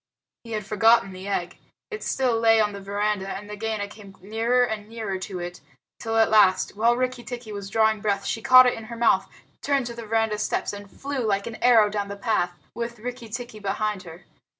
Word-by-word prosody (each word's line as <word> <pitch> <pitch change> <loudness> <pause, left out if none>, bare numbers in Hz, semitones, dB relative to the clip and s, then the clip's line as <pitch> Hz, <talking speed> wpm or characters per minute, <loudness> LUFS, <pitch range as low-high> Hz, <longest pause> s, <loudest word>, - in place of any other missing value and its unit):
He 230 -1 -8
had 210 -2 -3
forgotten 225 -1 +3
the 185 +1 -8
egg. 180 -3 -2 0.3
It 430 - -5
still 250 -4 0
lay 225 -1 +5
on 210 -1 +2
the 200 - -7
veranda, 200 0 -1
and 200 +1 -5
Nagaina 210 0 -3
came 200 -2 -13
nearer 225 +6 +1
and 215 -3 -3
nearer 220 -4 -4
to 185 0 -6
it, 175 0 -6 0.4
till 225 -1 -2
at 225 -1 +4
last, 200 -4 +4
while 235 +3 +3
Rikki 255 -1 -2
tikki 240 -1 -7
was 200 -1 -6
drawing 220 0 +2
breath, 200 -2 0
she 225 - -2
caught 255 +2 +8
it 250 - +3
in 225 - -8
her 235 +1 -8
mouth, 235 0 +3 0.3
turned 275 -2 +1
to 240 - -5
the 235 -1 -8
veranda 225 -1 +1
steps, - - -1
and 205 0 -9
flew 275 +6 -5
like 200 -4 0
an 230 - -6
arrow 230 -4 +6
down 205 -1 -3
the 200 0 -7
path, 180 -5 0 0.2
with 235 +1 -5
Rikki 240 +1 -7
tikki 240 -1 -6
behind 205 0 -2
her. 175 0 -12
220 Hz, 215 wpm, -25 LUFS, 200-235 Hz, 0.4 s, caught